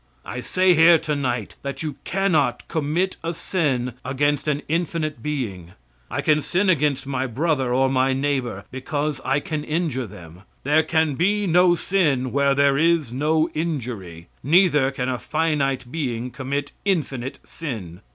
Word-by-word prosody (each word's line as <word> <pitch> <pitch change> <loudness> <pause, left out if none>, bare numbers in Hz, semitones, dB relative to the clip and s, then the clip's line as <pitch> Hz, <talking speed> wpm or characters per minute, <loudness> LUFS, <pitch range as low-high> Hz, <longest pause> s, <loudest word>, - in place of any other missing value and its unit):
I 120 - -5
say 185 +8 +3
here 165 +1 +7
to 150 -1 -2
night 125 -6 -2
that 140 +3 -5
you 150 -3 -4
cannot 190 -5 +1
commit 165 +4 -1
a 165 0 -2
sin 135 -10 -1
against 145 +3 0
an 150 -1 0
infinite 160 -2 -2
being. 105 - -4 0.4
I - - -2
can 155 0 +3
sin 185 +5 +2
against 145 -4 +1
my 135 -1 -2
brother 135 0 0
or 130 +2 +3
my 130 0 +2
neighbor, 130 -6 -1
because 145 +2 -3
I 135 +2 +1
can 150 0 -4
injure 150 -6 -1
them. 90 -1 -12 0.2
There 150 +3 +4
can 160 -2 +1
be 205 +8 +1
no 175 0 +5
sin 150 -9 +1
where 140 0 +2
there 140 0 +3
is 165 -6 +2
no 155 +4 +1
injury. 115 - -4
Neither 150 -3 +4
can 130 -2 -3
a 125 -2 -1
finite 145 -4 -1
being 125 -6 -3
commit 140 +2 -3
infinite 140 -10 -1
sin. 105 - -7
145 Hz, 155 wpm, -23 LUFS, 130-160 Hz, 0.4 s, here